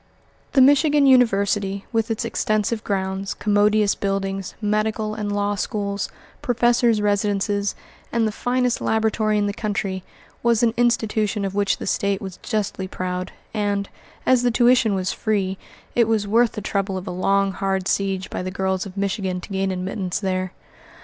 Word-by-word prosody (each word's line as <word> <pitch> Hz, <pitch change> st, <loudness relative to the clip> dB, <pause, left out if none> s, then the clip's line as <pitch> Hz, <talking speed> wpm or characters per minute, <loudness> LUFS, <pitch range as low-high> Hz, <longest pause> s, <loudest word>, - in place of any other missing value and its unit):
The 270 Hz, -, +6 dB
Michigan 290 Hz, +2 st, +5 dB
University, 200 Hz, -6 st, +3 dB
with 225 Hz, -1 st, 0 dB
its 225 Hz, 0 st, -2 dB
extensive 215 Hz, -1 st, 0 dB
grounds, 190 Hz, 0 st, -2 dB
commodious 210 Hz, 0 st, +3 dB
buildings, 195 Hz, -1 st, -3 dB
medical 215 Hz, 0 st, 0 dB
and 210 Hz, -1 st, -3 dB
law 205 Hz, 0 st, 0 dB
schools, 200 Hz, 0 st, -2 dB, 0.3 s
professors' 240 Hz, -1 st, +3 dB
residences, 205 Hz, 0 st, 0 dB, 0.4 s
and 230 Hz, -1 st, +2 dB
the -, -, -1 dB
finest 245 Hz, +2 st, 0 dB
laboratory 220 Hz, -1 st, +1 dB
in 205 Hz, -, +2 dB
the 205 Hz, -, -1 dB
country, 200 Hz, -3 st, -3 dB, 0.4 s
was 235 Hz, -1 st, +2 dB
an 230 Hz, -1 st, +3 dB
institution 220 Hz, -3 st, +1 dB
of 195 Hz, -, -3 dB
which 200 Hz, -1 st, +1 dB
the -, -, -6 dB
State 200 Hz, -1 st, 0 dB
was 190 Hz, -4 st, -7 dB
justly 205 Hz, -3 st, -2 dB
proud, 180 Hz, 0 st, -4 dB, 0.2 s
and, 205 Hz, -2 st, -1 dB, 0.4 s
as 255 Hz, -2 st, +4 dB
the 245 Hz, -, +2 dB
tuition 240 Hz, -3 st, +4 dB
was 185 Hz, -1 st, -1 dB
free, 195 Hz, -4 st, -1 dB, 0.3 s
it 235 Hz, -2 st, +3 dB
was 220 Hz, -2 st, +1 dB
worth 230 Hz, +3 st, +3 dB
the 210 Hz, -, -5 dB
trouble 195 Hz, -1 st, -1 dB
of 185 Hz, -, -6 dB
a 185 Hz, -, -4 dB
long, 195 Hz, +2 st, +1 dB
hard 190 Hz, 0 st, -1 dB
siege 195 Hz, -1 st, 0 dB
by -, -, -3 dB
the 185 Hz, -, -3 dB
girls 190 Hz, 0 st, -1 dB
of 195 Hz, 0 st, -12 dB
Michigan 195 Hz, -2 st, -1 dB
to 180 Hz, -, -11 dB
gain 195 Hz, -1 st, -1 dB
admittance 185 Hz, 0 st, -3 dB
there. 185 Hz, -2 st, -1 dB
205 Hz, 165 wpm, -22 LUFS, 195-220 Hz, 0.4 s, The